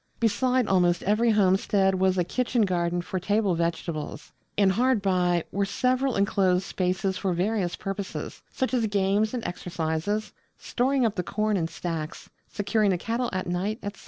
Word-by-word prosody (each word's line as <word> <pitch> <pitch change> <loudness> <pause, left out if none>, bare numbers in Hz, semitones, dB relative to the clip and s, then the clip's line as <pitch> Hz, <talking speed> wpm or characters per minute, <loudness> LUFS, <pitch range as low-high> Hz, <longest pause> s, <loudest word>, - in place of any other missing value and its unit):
Beside 245 +3 +2
almost 175 -3 +2
every 215 +4 +2
homestead 195 -1 +3
was 190 0 +2
a 180 - +3
Kitchen 240 +5 0
Garden 175 -2 0
for 185 - -3
table 205 +1 +1
vegetables. 170 -2 -3 0.3
And 200 -2 +4
hard 250 +4 +2
by 180 -3 +1
were 200 - 0
several 255 +6 0
enclosed 195 -2 +2
spaces 185 0 -1
for 190 -3 0
various 185 0 0
purposes, 195 0 -5
such 260 -1 -2
as 235 -3 +2
games 205 +3 +1
and 240 - -4
exercises, 175 +4 -2 0.2
storing 260 +1 0
up 220 - +1
the 180 - -1
corn 215 +3 -1
in 165 -4 0
stacks, 165 -2 -5 0.2
securing 205 0 0
the 185 - +2
cattle 230 +6 -2
at 185 -1 -2
night, 185 +5 -2
etc. 205 0 -6
195 Hz, 160 wpm, -26 LUFS, 180-215 Hz, 0.3 s, And